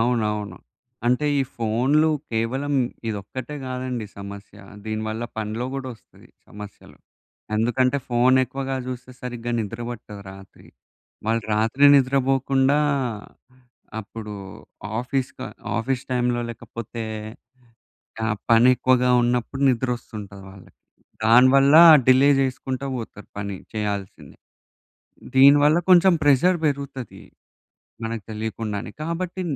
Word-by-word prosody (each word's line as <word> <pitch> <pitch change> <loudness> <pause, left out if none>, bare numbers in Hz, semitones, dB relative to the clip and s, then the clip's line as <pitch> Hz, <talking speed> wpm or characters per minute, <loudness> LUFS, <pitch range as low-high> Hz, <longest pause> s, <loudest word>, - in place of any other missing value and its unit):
అవునవును. 105 -3 -1 0.5
అంటే 125 +5 +2
ఈ - - +3
ఫోన్‌లు 125 +8 +2 0.2
కేవలం 130 +6 -1 0.3
ఇదొక్కటే 115 +7 -6
కాదండి 125 -3 -4
సమస్య. 100 +1 -10 0.3
దీనివల్ల 110 +1 -3 0.2
పన్లో 110 +3 -3
గూడా 135 -1 -4
వస్తది, - - -22 0.2
సమస్యలు. 105 -1 -12 0.6
ఎందుకంటే, 125 +4 +1
ఫోన్ 125 +2 +3
ఎక్కువగా 135 +2 -4
చూస్తే 130 0 -7
సరిగ్గా 120 -1 -5
నిద్ర 110 +2 -6
పట్టదు 105 -3 -9
రాత్రి. 95 -1 -15 0.6
వాళ్ళు 115 0 +1
రాత్రి 115 +6 +2
నిద్రపోకుండా, 135 +1 +2 1.2
అప్పుడు 105 0 -9 0.7
ఆఫీస్ 130 +1 -2
క - - -13 0.4
ఆఫీస్ 125 +2 -2
టైమ్‌లో 120 -1 0
లేకపోతే 115 0 -8 1.3
ఆ - - 0 0.2
పని 115 +2 +6
ఎక్కువగా 125 0 +2
ఉన్నప్పుడు 125 +3 -1
నిద్ర 125 0 0
వస్తుంటది 100 -4 -10
వాళ్ళకి. 95 -1 -17 0.5
దానివల్ల 130 +5 +6 0.3
డిలే 130 +2 +6
చేసుకుంటూ 130 0 -3
పోతారు 110 -2 -9
పని 100 -1 -4 0.2
చేయాల్సింది. 100 -3 -5 1.0
దీనివల్ల 145 +4 +6
కొంచెం 180 0 +7
ప్రెజర్ 160 +6 +4
పెరుగుతది, 140 -4 -4 0.8
మనకు 115 -2 -4
తెలియకుండానే. 110 0 -4
కాబట్టి 180 +3 -3
120 Hz, 100 wpm, -23 LUFS, 110-135 Hz, 1.3 s, కొంచెం